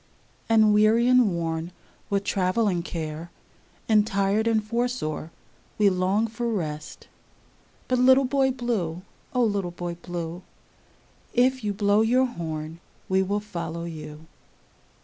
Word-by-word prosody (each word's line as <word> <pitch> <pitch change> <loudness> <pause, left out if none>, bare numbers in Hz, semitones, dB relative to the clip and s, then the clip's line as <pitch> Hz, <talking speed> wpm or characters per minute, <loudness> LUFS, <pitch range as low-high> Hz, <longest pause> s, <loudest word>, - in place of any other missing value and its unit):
And 215 -2 +5
weary 215 +3 +4
and 250 -4 +5
worn 165 0 -3 0.4
with 200 -1 0
travel 195 +3 +1
and 175 -3 0
care, 160 -1 -5 0.6
And 215 -1 +4
tired 200 +3 +1
and 220 -2 +2
footsore 235 -9 -2 0.5
we 205 -2 +4
long 190 +4 +1
for 235 +1 -3
rest; 155 -7 -5 0.8
But 255 -1 +1
little 260 +2 +6
Boy 270 0 +2
Blue, 220 -10 -2 0.3
O 250 - +3
little 200 -5 0
Boy 175 0 -5
Blue, 175 0 -6 0.9
If 255 0 +3
you 210 - 0
blow 205 +1 +2
your 250 +4 +3
horn 160 -7 -5 0.3
we 190 0 +3
will 200 +2 0
follow 170 -5 -5
you. 155 -2 -8
200 Hz, 130 wpm, -25 LUFS, 170-230 Hz, 0.9 s, little